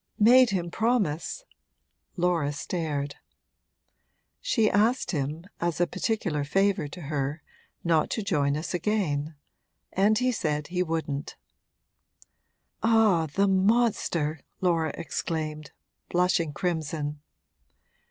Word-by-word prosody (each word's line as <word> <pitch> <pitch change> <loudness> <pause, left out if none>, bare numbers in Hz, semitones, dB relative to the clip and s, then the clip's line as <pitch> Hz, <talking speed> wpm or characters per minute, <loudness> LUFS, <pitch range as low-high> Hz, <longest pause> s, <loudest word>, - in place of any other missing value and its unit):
'Made 245 +3 +7
him 175 -4 -2
promise 225 - 0 0.3
?' - - -45
Laura 170 -5 +1
stared. 145 -2 -3 1.2
'She 245 - +2
asked 225 +6 +2
him 150 +1 -3
as 170 -2 -1
a 175 - +4
particular 175 -6 -1
favour 195 +2 +1
to 175 +5 -9
her 145 0 -3 0.4
not 165 -3 +2
to 220 - -2
join 145 -7 +1
us 155 - -4
again. 165 -6 -1 0.6
And 205 +3 +3
he 255 +1 +2
said 150 -9 -2
he 180 0 -1
wouldn't.' 160 -4 -3 1.5
'Ah, 220 -8 +4
the 195 +7 +1
monster!' 190 -6 +2 0.2
Laura 165 -4 +1
exclaimed, 155 -2 -3 0.4
blushing 175 -3 +2
crimson. 150 -2 -3
170 Hz, 105 wpm, -27 LUFS, 150-200 Hz, 1.5 s, Made